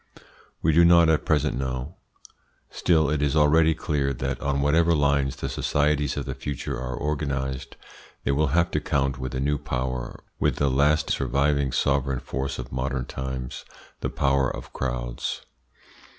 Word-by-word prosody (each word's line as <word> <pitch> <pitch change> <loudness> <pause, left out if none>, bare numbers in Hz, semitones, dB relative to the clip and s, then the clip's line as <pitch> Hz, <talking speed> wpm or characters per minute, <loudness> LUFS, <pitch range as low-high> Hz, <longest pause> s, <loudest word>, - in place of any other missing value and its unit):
We 80 - +4
do 85 +3 +5
not 85 -1 +6
at 80 -2 +2
present 75 -1 +2
know. 65 +3 -3 0.8
Still 80 -4 +2
it 75 -1 0
is 75 0 +1
already 80 +1 +4
clear 70 -3 -1
that 65 +1 -3
on 70 0 0
whatever 80 +4 +3
lines 70 -2 +2
the - - -4
societies 75 0 0
of - - -3
the - - -3
future 70 -3 -4
are 65 -1 -4
organised, 70 -3 -3 0.5
they - - +1
will 75 +3 +2
have 85 +5 +2
to 75 - +1
count 70 -2 -1
with 65 0 -4
a - - -1
new 70 +1 0
power, 65 -3 -4 0.2
with - - +1
the 70 -2 +1
last 75 +4 +2
surviving 70 +1 +1
sovereign 70 -1 +1
force 70 +2 -4
of 65 -1 -7
modern 65 0 -2
times, 65 -1 -5 0.4
the - - -2
power 70 -2 +1
of - - -8
crowds. - - -3
70 Hz, 165 wpm, -25 LUFS, 65-75 Hz, 0.8 s, not